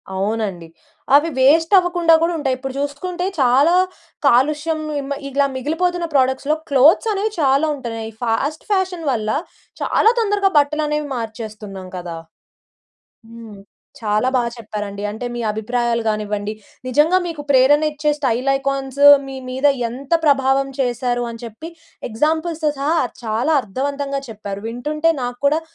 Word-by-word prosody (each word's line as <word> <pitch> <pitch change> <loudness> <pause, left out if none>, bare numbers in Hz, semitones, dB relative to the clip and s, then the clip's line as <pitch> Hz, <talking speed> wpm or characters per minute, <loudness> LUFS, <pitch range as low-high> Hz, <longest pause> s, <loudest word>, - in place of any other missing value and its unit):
అవునండి. 195 -3 -2 0.5
అవి 300 +3 +4
వేస్ట్ 325 +7 +4
అవ్వకుండా 350 -2 +3
కూడా 345 - +1
ఉంటాయి. 270 -4 0
ఇప్పుడు 265 0 -6
చూసుకుంటే, 345 +6 -3 0.2
చాలా 270 +7 +4 0.5
కాలుష్యం 300 +5 +2 0.2
హ్మ్, 280 0 -4
ఇగిలా 280 +1 +1
మిగిలిపోతున్న 340 +6 -1
ప్రోడక్ట్స్‌లో 265 +3 +2
క్లోత్స్ 310 - +5
అనేవి 415 +2 -1
చాలా 275 +2 +3
ఉంటున్నాయి. 230 -4 -6
ఈ - - -26
ఫాస్ట్ 275 +7 -1
ఫ్యాషన్ 370 -4 0
వల్ల 215 -3 -2 0.5
చాలా 450 - +3
తొందరగా 405 -2 +1
బట్టలు 300 +1 0
అనేవి 300 0 -2
మార్చేస్తున్నాం 215 -4 -7
కదా! 170 -2 -7 1.1
హ్మ్. 230 -3 -11 0.4
చాలా 215 +2 +1
బాగా 240 -2 +1
చెప్పారండి. 210 -3 -6
అంటే 220 +4 -6
మీ - - -4
అభిప్రాయాలు 235 +2 -1
కానివ్వండి, 210 -1 -2 0.3
నిజంగా 300 +8 +3
మీకు 325 -3 -5
ప్రేరణ 275 +3 +5
ఇచ్చే 300 0 -1
స్టైల్ 260 -2 0
ఐకాన్స్ 275 0 -3 0.3
మీ, 270 - -7
మీద 260 +3 +1 0.2
ఎంత 265 +6 -9
ప్రభావం 270 -1 +3
చేశారు 245 -1 0
అని 230 -1 -9
చెప్పి, 235 +7 -8 0.4
ఎగ్జాంపుల్స్‌తో 315 +6 0
సహా, 295 +5 0 0.3
చాలా 230 +8 0
అర్థవంతంగా 275 +6 -3
చెప్పారు. 205 -2 -6
వింటుంటే 300 +8 0
నాకు 245 0 -4
కూడా 300 +3 +3
270 Hz, 135 wpm, -19 LUFS, 230-305 Hz, 1.1 s, క్లోత్స్